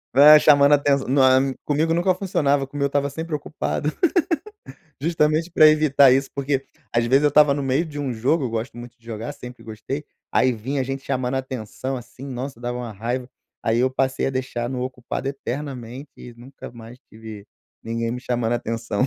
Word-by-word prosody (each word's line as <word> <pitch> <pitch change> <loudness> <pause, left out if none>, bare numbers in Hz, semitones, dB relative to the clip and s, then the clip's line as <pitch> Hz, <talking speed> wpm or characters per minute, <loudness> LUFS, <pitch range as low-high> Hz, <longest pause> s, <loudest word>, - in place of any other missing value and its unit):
É 150 +2 +9
chamando 145 -1 +5
atençã 140 -1 +2
nao 135 0 +4 0.3
é - - -5
comigo 155 +3 +1
nunca 175 +2 +2
funcionava, 145 -8 0
como 140 +1 -7
eu 140 - +3
estava 140 0 0
sempre 160 +1 -4
ocupado. 150 0 -3 1.1
Justamente 155 +1 +1
pra 155 -2 +6
evitar 150 -3 +5
isso, 135 +1 +1
porque 140 -1 -1 0.3
às 120 0 +2
vezes 135 +4 +4
eu 150 - +5
estava 145 -1 +5
no 140 - -3
meio 135 +5 +1
de 150 -2 -8
um 135 -3 -2
jogo, 135 +7 0
eu 125 - -2
gosto 115 +1 -4
muito 120 0 -11
de 115 - -31
jogar, 115 +4 -5
sempre 125 -4 -11
gostei, 115 +7 -6 0.3
aí 130 - +3
vinha 130 +5 -3
gente 135 +1 -5
chamando 130 0 -2
atenção, 130 0 -4
assim, 125 +2 -11
nossa, 130 -1 -6
dava 120 0 -3
uma 120 -3 -6
raiva. 120 +5 -4 0.4
Aí 115 +1 +2
eu 130 +1 +2
passei 130 0 0
a - - 0
deixar 130 -2 -3
no 125 -1 -3
ocupado 130 +1 -4
eternamente 135 -1 -6
e 120 -1 -11
nunca 130 +3 -11
mais 115 +1 -12
tive 110 -2 -11 0.4
ninguém 115 0 -3
me 125 +1 -4
chamando 120 -2 -1
atenção. 115 0 -2
130 Hz, 190 wpm, -22 LUFS, 120-145 Hz, 1.1 s, É